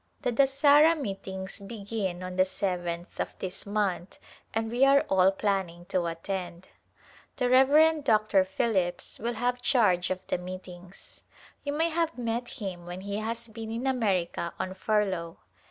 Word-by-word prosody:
The - - +1
Dasahra 285 +5 +5
meetings 195 -5 -5
begin 200 -3 -4
on 185 0 -5
the 185 - +5
seventh 180 -2 -3
of - - -3
this 190 +2 -6
month 200 -3 -1 0.3
and 225 0 -2
we 245 +3 +2
are 275 +1 +6
all 190 0 +5
planning 190 -4 -2
to 180 -3 0
attend. 175 +1 -5 0.7
The 250 - 0
Rev. 295 +5 +5
Dr. 215 -5 +3
Phillips 185 -2 -1
will 235 +2 -2
have 245 +2 -1
charge 205 -10 +3
of 185 0 -3
the - - -1
meetings. 180 0 -10 0.4
You 285 - -2
may 325 +3 +1
have 330 -1 -1
met 240 0 -2
him 185 -7 -6
when 180 +1 -6
he 200 +1 -4
has 230 +2 -3
been 220 0 -7
in 230 +3 -3
America 195 -10 0
on 185 - -3
furlough. 190 -4 -1
200 Hz, 155 wpm, -28 LUFS, 185-245 Hz, 0.7 s, are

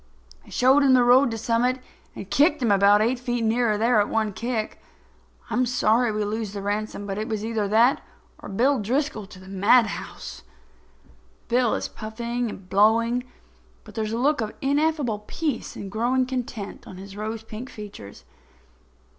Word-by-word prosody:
I - - -18
showed 265 +3 +4
him 270 -2 +5
the 250 - +5
road 250 +2 +5
to 225 - -4
Summit 240 +3 +1 0.4
and - - -7
kicked 295 - +3
him 235 -5 +1
about 200 +1 +5
eight 240 +3 0
feet 245 -1 -2
nearer 225 -1 +2
there 225 +1 +3
at 205 - -1
one 220 -2 0
kick. 230 +1 -3 0.7
I'm 245 +3 +1
sorry 240 -1 +2
we 210 0 -1
lose 215 -1 -3
the 200 - -5
ransom; 205 0 -3
but 200 0 -4
it 215 - -3
was 215 -1 -3
either 220 -2 -1
that 230 +6 +3 0.4
or - - -9
Bill 255 +7 +2
Driscoll 235 0 -2
to 190 - -13
the 185 0 -14
madhouse." 205 +4 +1 1.1
Bill 245 -1 +2
is - - -3
puffing 235 +2 -4
and 195 -3 -10
blowing, 230 +5 +3 0.6
but 215 - -14
there 220 +1 -2
is 215 - -3
a 225 - -2
look 280 +2 +2
of 215 -1 -4
ineffable 285 -5 0
peace 300 -8 -3
and 195 -1 -7
growing 245 +4 +1
content 250 -5 -5
on 185 - -10
his 195 +1 -10
rose 215 +1 -5
pink 225 +3 -8
features. 105 - -10
225 Hz, 175 wpm, -24 LUFS, 210-250 Hz, 1.1 s, him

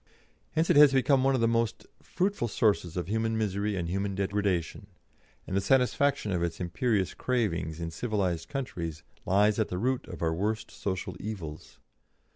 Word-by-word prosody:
Hence 160 +1 +2
it - - +4
has 145 -2 +8
become 135 0 +3
one 135 0 +3
of 125 - 0
the 115 - +4
most 115 -1 0 0.2
fruitful 190 -8 -1
sources 100 -6 +1
of 90 - -2
human 110 +2 0
misery 105 -1 -1
and 85 -2 -2
human 100 +2 -2
degradation, 100 -3 -1 0.6
and 95 - -4
the 100 - +2
satisfaction 135 -1 +2
of 90 -2 0
its 85 -1 -2
imperious 95 +2 0
cravings 85 -11 -1
in 85 -1 -4
civilised 95 -4 -2
countries 85 - -4 0.2
lies 105 +3 +3
at 110 - +2
the 90 - -4
root 125 +6 -1
of - - -7
our 80 -1 +1
worst 105 +5 -2
social 95 -2 -4
evils. 90 -8 -7
105 Hz, 170 wpm, -29 LUFS, 90-120 Hz, 0.6 s, has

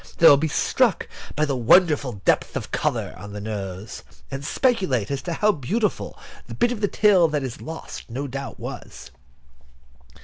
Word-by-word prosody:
They 165 - +7
will 145 - +10
be 155 +3 0
struck 220 - +1 0.3
by 155 - +2
the 140 -2 -1
wonderful 135 - +3
depth - - +2
of - - -6
the - - 0
colour - - -1
on 100 +2 -9
the 105 - -5
nose, 100 -1 -6 0.3
and 135 +1 -5
speculate 145 - +1
as 140 - -2
to 175 - -4
how 210 +5 +3
beautiful 205 - -2 0.3
the - - -7
bit 240 0 +2
of 230 -4 -4
the 205 - +3
tail 195 -5 +4
that 150 -3 -1
is 130 -3 -6
lost 160 -4 -8
no 130 +5 -4
doubt 135 0 -6
was. - - -8
145 Hz, 180 wpm, -23 LUFS, 120-190 Hz, 0.3 s, will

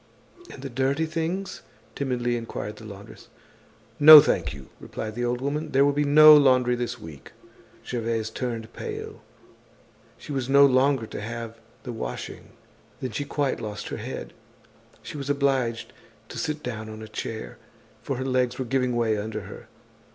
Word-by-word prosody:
"And 135 - -11
the 135 - -5
dirty 135 +5 0
things?" 170 +4 -3 0.3
timidly 125 -3 -1
inquired 115 -2 -6
the 110 - -12
laundress. 100 -1 -12 0.7
"No, 155 +1 +12
thank - - +1
you," 70 -1 -11
replied 110 -1 -6
the 120 +2 -3
old 120 +1 -1
woman, 150 +3 -3
"there 135 +1 +5
will 145 - +2
be 145 +1 +1
no 155 +1 +9
laundry 130 -4 +4
this 120 0 -4
week." 80 -9 -12 0.5
Gervaise 115 -2 -2
turned 115 -2 -5
pale. - - -7 1.0
She - - -10
was 135 -2 -3
no 140 +1 +7
longer 135 -2 +3
to 110 - -7
have 115 +1 -6 0.2
the 125 - -6
washing. 110 - -7 0.5
Then 130 - -4
she 145 +7 -3
quite 140 -3 -1
lost 105 -2 -6
her - - -5
head; - - -7 0.7
she - - -8
was 140 0 -6
obliged 135 -5 0 0.4
to - - -6
sit 150 -1 -3
down 110 -3 -5
on 110 0 -9
a - - -8
chair, 110 0 -6 0.4
for 135 - -3
her 130 - -3
legs 130 -2 0
were 130 - -3
giving 125 0 0
way 110 -3 +1
under 110 +1 -4
her. 100 +1 -11
125 Hz, 165 wpm, -25 LUFS, 115-140 Hz, 1.0 s, No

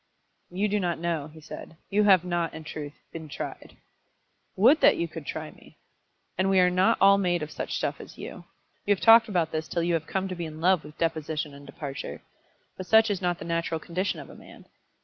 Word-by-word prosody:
"You 195 +4 0
do 210 0 0
not 175 -3 -1
know," 165 -3 -2
he 160 +1 -14
said. 160 +1 -10
"You 210 +1 +3
have 190 -3 +5
not, 175 -3 -1
in 160 - -8
truth, 150 -2 -7 0.2
been 160 -2 -8
tried." - - -7 0.8
"Would 250 +11 +5
that - - +6
you 170 - -1
could 160 -2 -9
try 155 -1 -5
me!" - - -19 0.6
"And 190 +1 +2
we 190 -1 +4
are 180 0 +5
not 185 +1 +3
all 200 +1 +6
made 175 -4 +1
of 150 - -7
such - - -4
stuff - - -2
as - - -13
you. - - -9 0.4
You 205 - +5
have - - -14
talked 225 0 +8
about 175 -5 0
this 155 0 -3
till 170 - -1
you 170 0 +1
have 160 -1 -1
come 190 0 -1
to 185 - -5
be 170 -2 -4
in 155 0 -9
love 180 0 +3
with 150 0 -13
deposition 155 -2 -2
and 140 0 -13
departure. 145 -5 -7 0.5
But 185 - -7
such 220 +1 +5
is 195 -2 -2
not 175 -1 0
the - - -8
natural 165 -1 -1
condition 180 +4 -2
of - - -10
a - - -13
man. - - -15
170 Hz, 225 wpm, -27 LUFS, 160-190 Hz, 0.8 s, talked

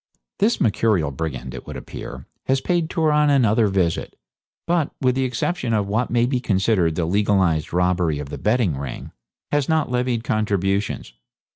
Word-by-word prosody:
This 225 +3 +2
mercurial 100 -8 +2
brigand, 65 -3 -5
it - - -9
would - - -6
appear, - - -8 0.2
has 135 0 +2
paid 170 +1 0
Turon 150 -2 +2
another 115 -5 +4
visit, 95 -4 -1 0.5
but, 170 -3 +1
with 130 -2 +2
the 130 +1 0
exception 125 0 -1
of 105 -2 +1
what 110 +5 -1
may 120 0 +2
be 125 0 0
considered 95 -6 +1
the 85 - 0
legalised 95 -4 +1
robbery 90 -3 +1
of 70 -1 -6
the - - -6
betting 105 - +1
ring, 70 -3 -6 0.4
has 145 -1 +1
not 155 -5 +1
levied 125 -2 0
contributions. 100 - -1
110 Hz, 160 wpm, -22 LUFS, 90-130 Hz, 0.5 s, another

